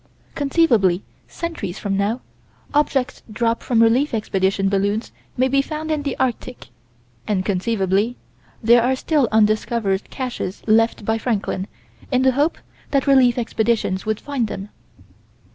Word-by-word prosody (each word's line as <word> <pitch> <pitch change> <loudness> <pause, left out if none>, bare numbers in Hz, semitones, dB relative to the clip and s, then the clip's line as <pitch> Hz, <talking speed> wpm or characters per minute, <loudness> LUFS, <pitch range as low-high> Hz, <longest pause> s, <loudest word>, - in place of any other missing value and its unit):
Conceivably 240 - +2 0.2
centuries 325 - -5
from 200 -1 -2
now, 205 +5 0 0.5
objects 280 -3 +1
dropped 230 +1 0
from 230 -2 +3
relief 240 +4 +3
expedition 195 -2 0
balloons 200 +3 0 0.3
may 255 +1 +3
be 275 +1 +3
found 310 +2 -5
in 305 -1 0
the 280 -2 -3
Arctic, 250 - -3 0.6
and 190 -3 0
conceivably 200 +3 0 0.5
there 235 +2 +6
are 255 +3 +2
still 285 -1 +1
undiscovered 215 -2 +1
caches 245 -7 -5
left 225 -1 +2
by 225 +1 0
Franklin, 205 -5 -2 0.4
in 255 0 +2
the 260 - +5
hope 290 +5 +1 0.3
that 275 -2 +1
relief 260 -4 +5
expeditions 225 -4 0
would 215 -1 -2
find 275 -6 -2
them. 200 0 -6
230 Hz, 135 wpm, -21 LUFS, 205-260 Hz, 0.6 s, there